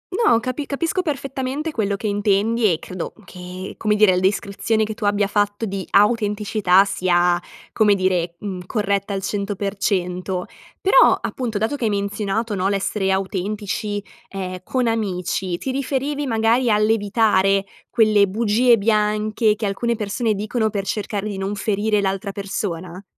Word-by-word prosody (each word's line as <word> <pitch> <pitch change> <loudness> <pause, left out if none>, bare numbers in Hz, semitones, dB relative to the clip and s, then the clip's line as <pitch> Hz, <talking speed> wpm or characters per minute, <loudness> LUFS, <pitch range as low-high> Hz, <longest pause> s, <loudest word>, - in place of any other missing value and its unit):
No 405 - +4
capi 255 +4 -3
capisco 335 +6 -1
perfettamente 280 0 -3
quello 205 -6 -1
che 215 - -8
intendi 205 +1 +2
e 160 - +1
credo 180 +1 -6
che, 180 +1 -8
come 210 -1 +1
dire 210 -3 +5
il 180 - +1
descrizione 200 +3 0
che 215 0 -3
tu 210 -1 -5
abbia 205 0 +2
fatto 205 +1 0
di 195 -2 -4
autenticità 205 -2 +3
sia, 175 -2 +2 0.3
come 210 -2 +4
dire, 180 -3 0
mhmm, 185 -3 -6
corretta 200 -2 -1
al 195 -1 -3
100%; 195 -3 -2 0.3
però, 445 +6 +5
appunto 235 -5 -3
dato 220 +7 0
che 235 - -2
hai - - +2
menzionato 205 +2 -2
no, 190 -1 0
l'essere 195 0 -1
autentici, 205 +2 -2 0.3
ehm, 185 -2 -5
con 255 +3 -1
amici, 185 -4 -1
ti 265 - -4
riferivi 275 +2 -2
magari 230 +2 +2
all'evitare 210 -2 +2 0.2
quelle 215 -3 +4
bugie 230 +4 +3
bianche, 215 +1 +1
che 215 - -4
alcune 235 +4 -1
persone 215 +1 -1
dicono 220 +2 -1
per 200 -2 -3
cercare 210 -1 -3
di 200 -2 -4
non 195 +2 -2
ferire 210 +1 0
l'altra 195 0 -2
persona? 185 -2 -5
205 Hz, 150 wpm, -21 LUFS, 195-225 Hz, 0.3 s, dire